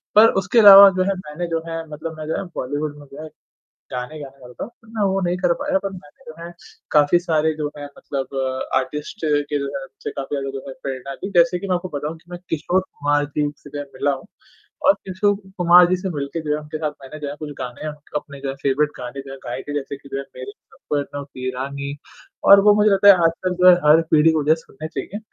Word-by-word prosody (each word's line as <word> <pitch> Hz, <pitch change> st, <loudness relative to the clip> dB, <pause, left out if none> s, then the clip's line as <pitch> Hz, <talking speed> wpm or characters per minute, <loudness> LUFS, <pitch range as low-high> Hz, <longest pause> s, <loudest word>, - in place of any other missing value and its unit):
पर 220 Hz, +2 st, +8 dB
उसके 215 Hz, +5 st, +3 dB
अलावा 200 Hz, -2 st, +11 dB
जो 185 Hz, -, +3 dB
है 195 Hz, -, 0 dB
मैंने 175 Hz, -1 st, -6 dB
जो 165 Hz, -1 st, -2 dB
है 165 Hz, 0 st, -4 dB
मतलब 155 Hz, +2 st, -7 dB
मैं 155 Hz, -1 st, -7 dB
जब 175 Hz, +3 st, -3 dB
बॉलीवुड 145 Hz, +3 st, -3 dB
में 145 Hz, -, -14 dB
गया 155 Hz, +3 st, -8 dB, 0.6 s
गाने 125 Hz, +5 st, -5 dB
गाने 135 Hz, -1 st, -11 dB
वाला 125 Hz, -1 st, -12 dB
था -, -, -2 dB
पर 230 Hz, -1 st, -22 dB
मैं 220 Hz, -2 st, -2 dB
वो 195 Hz, 0 st, 0 dB
नहीं 175 Hz, 0 st, 0 dB
कर 175 Hz, -1 st, +2 dB
पाया 290 Hz, 0 st, +1 dB
पर 195 Hz, -, -4 dB
मैंने 175 Hz, -6 st, -14 dB
जो -, -, -15 dB
है 170 Hz, -, -8 dB, 0.4 s
काफ़ी 150 Hz, +3 st, +5 dB
सारे 160 Hz, -2 st, +1 dB
जो 150 Hz, -1 st, -2 dB
है 145 Hz, -, -7 dB
मतलब 140 Hz, -1 st, -6 dB, 0.4 s
आर्टिस्ट 150 Hz, +8 st, -3 dB
के 145 Hz, -1 st, 0 dB
जो 140 Hz, -, -3 dB
है 140 Hz, -1 st, -5 dB
जिनसे 135 Hz, -, -8 dB
काफ़ी 140 Hz, +1 st, -5 dB
ज्यादा 135 Hz, 0 st, -3 dB
जो 135 Hz, -, -8 dB
है 135 Hz, -, -6 dB
प्रेरणा 135 Hz, 0 st, -5 dB
ली, 190 Hz, -, -6 dB
जैसे 170 Hz, +1 st, +4 dB
कि 195 Hz, -, -6 dB
मैं 185 Hz, -, +1 dB
आपको 180 Hz, +1 st, -4 dB
बताऊँ 150 Hz, +3 st, -4 dB
कि 175 Hz, +2 st, -22 dB
मैं 175 Hz, -, -6 dB
किशोर 175 Hz, +4 st, 0 dB
कुमार 145 Hz, -5 st, -1 dB
जी 145 Hz, -1 st, +1 dB
से 145 Hz, -, -14 dB
मैं 145 Hz, -, -3 dB
मिला 140 Hz, +2 st, +1 dB
हूँ 135 Hz, -, -8 dB, 0.6 s
और 290 Hz, -, +7 dB
किशोर 200 Hz, -3 st, -1 dB, 0.2 s
कुमार 175 Hz, 0 st, +7 dB
जी 185 Hz, -, +3 dB
से 190 Hz, +1 st, -4 dB
मिलके 145 Hz, 0 st, -4 dB
उनके 155 Hz, -, -6 dB
साथ -, -, +2 dB
जो -, -, +2 dB
है -, -, -4 dB
उनके 150 Hz, +1 st, -6 dB
साथ 155 Hz, -1 st, -2 dB
मैंने 150 Hz, +3 st, -9 dB
जो 150 Hz, -, -5 dB
है 145 Hz, -, -6 dB
कुछ 150 Hz, -1 st, -6 dB
गाने 125 Hz, +4 st, -6 dB, 0.3 s
अपने 140 Hz, -1 st, -9 dB
जो 135 Hz, -, -3 dB
है 135 Hz, -, -4 dB
फ़ेवरेट 145 Hz, +2 st, +2 dB
गाने 125 Hz, +2 st, -6 dB
जो 135 Hz, -, -9 dB
है 135 Hz, -, -8 dB
गाए 125 Hz, +2 st, -4 dB
थे 145 Hz, -, -4 dB
जैसे 140 Hz, -1 st, -4 dB
कि 140 Hz, 0 st, -16 dB
जो 135 Hz, -, -2 dB
है 140 Hz, -, -4 dB
मेरे 130 Hz, +1 st, -7 dB, 0.2 s
सपनों 145 Hz, -1 st, -4 dB
की 130 Hz, -2 st, -6 dB
रानी 140 Hz, +2 st, -5 dB, 0.5 s
और 200 Hz, 0 st, +10 dB
वो -, -, +8 dB
मुझे 210 Hz, 0 st, +4 dB
लगता 195 Hz, +1 st, +4 dB
है 200 Hz, -, +11 dB
आजकल 180 Hz, +2 st, 0 dB
जो 185 Hz, -, +9 dB
है 180 Hz, -, +8 dB
हर 155 Hz, +2 st, +7 dB
पीढ़ी 155 Hz, +1 st, +5 dB
को 155 Hz, -2 st, 0 dB
जो 150 Hz, -, +3 dB
है -, -, +6 dB
सुननें 155 Hz, -1 st, -10 dB
चाहिए। 200 Hz, +5 st, -6 dB
150 Hz, 255 wpm, -21 LUFS, 140-180 Hz, 0.6 s, अलावा